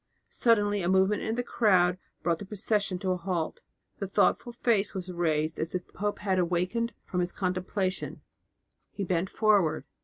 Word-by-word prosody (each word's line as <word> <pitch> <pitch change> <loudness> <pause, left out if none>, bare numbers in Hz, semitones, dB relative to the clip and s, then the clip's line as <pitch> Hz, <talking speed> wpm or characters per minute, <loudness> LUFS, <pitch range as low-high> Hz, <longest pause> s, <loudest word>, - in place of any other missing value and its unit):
Suddenly 205 -3 +2
a 175 - 0
movement 190 +2 +3
in 220 - -1
the 245 - -1
crowd 185 -7 +3 0.2
brought 170 -1 +1
the - - -7
procession 205 -2 0
to 185 0 -1
a 180 - 0
halt; 175 -2 -2 0.4
the 195 - -2
thoughtful 205 +4 +2
face 225 -4 +1
was 185 -1 -4
raised 160 -2 0
as 160 +3 -2
if 180 - -2
the - - -25
pope 205 +1 -2
had 190 -2 0
awakened 180 +7 0
from 180 - -3
his 175 0 0
contemplation; 185 0 -2 0.7
he 200 - -5
bent 180 0 0
forward. 205 -7 +2
190 Hz, 175 wpm, -29 LUFS, 180-205 Hz, 0.7 s, movement